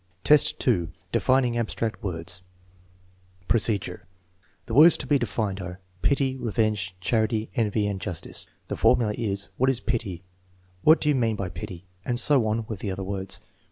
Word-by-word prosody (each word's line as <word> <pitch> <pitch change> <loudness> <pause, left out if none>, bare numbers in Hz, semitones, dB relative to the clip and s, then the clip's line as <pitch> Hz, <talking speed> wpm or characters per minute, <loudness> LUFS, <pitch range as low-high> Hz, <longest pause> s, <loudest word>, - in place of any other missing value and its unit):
2. 125 - +3 0.2
Defining 125 -2 +2
abstract 115 -1 -2
words 90 -1 -3 1.1
Procedure. 105 -6 0 0.6
The - - -6
words 160 +4 +8
to - - -4
be 145 -2 +3
defined 105 -5 -2
are 90 0 -7 0.2
pity, 135 -2 +2
revenge, 105 -6 -1
charity, 110 +2 0
envy, 110 -4 +1
and 100 -2 -2
justice. 95 -6 -4 0.2
The - - -3
formula 110 -3 +3
is, 100 -4 -3
" - - -38
What 130 +1 +3
is 130 -3 +1
pity? 100 -9 -3 0.6
What 155 +7 +6
do 150 - +2
we - - +4
mean 115 -5 +1
by 100 -3 -3
pity? 90 +1 -8
" 90 - -37
and 120 -1 -1
so 130 -4 +3
on 110 +1 -1
with 110 -4 -5
the 100 - -3
other 95 +1 -3
words. 95 0 -2
110 Hz, 165 wpm, -26 LUFS, 95-120 Hz, 1.1 s, words